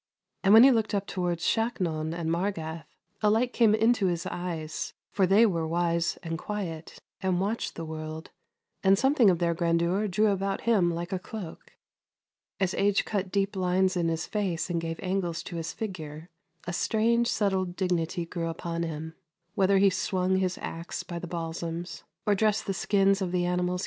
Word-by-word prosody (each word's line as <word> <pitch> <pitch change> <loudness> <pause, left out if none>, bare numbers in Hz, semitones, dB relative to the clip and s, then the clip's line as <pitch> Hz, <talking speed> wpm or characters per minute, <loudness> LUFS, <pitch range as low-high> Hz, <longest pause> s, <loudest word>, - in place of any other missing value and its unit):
And 195 - +4
when 225 - +10
he 270 - +8
looked 220 -3 +1
up 200 0 -1
towards 175 -3 -2
Shaknon 175 -9 0
and 165 -1 -2
Margath, 165 -4 -2 0.3
a 210 - +4
light 240 +4 +2
came 220 -3 +4
in 225 +2 +4
his 180 -7 -1
eyes, 165 -3 -4 0.2
for 190 -2 +2
they 205 +5 +6
were 165 -6 0
wise 170 0 0
and 165 -1 -4
quiet, 175 -6 -5 0.2
and 185 -2 +1
watched 205 +4 -2
the 165 - -5
world, 155 +1 -6 0.5
and 195 0 +5
something 265 -2 +4
of 180 - +3
their 170 0 +1
grandeur 170 +4 +1
drew 210 +3 +2
about 195 0 -1
him 205 -7 +3
like 170 +3 -4
a 185 - -1
cloak. 190 -4 -9 0.9
As 190 -2 +1
age 200 0 +2
cut 195 -3 -2
deep 200 +1 0
lines 185 0 +2
in 170 -2 +1
his 165 -1 -1
face 190 -5 -2
and 170 -1 0
gave 165 0 -4
angles 180 -3 -1
to 175 - -7
his 165 0 -3
figure, 165 -6 -7 0.3
a 175 - -4
strange, 230 +5 +2
settled 190 -5 0
dignity 175 -2 -1
grew 165 0 -4
upon 170 0 -4
him, 160 -1 -4 0.4
whether 195 -2 +3
he 195 0 +5
swung 185 0 0
his 185 -1 0
axe 165 +1 -5
by 175 -2 -6
the 175 - -6
balsams 165 0 -5 0.2
or 210 - +4
dressed 215 +1 +1
the 195 - -1
skins 195 +2 +2
of 185 -2 -1
the 180 -1 +1
animals 180 0 0
he - - -1
had! 180 - -2
180 Hz, 185 wpm, -28 LUFS, 170-200 Hz, 0.9 s, when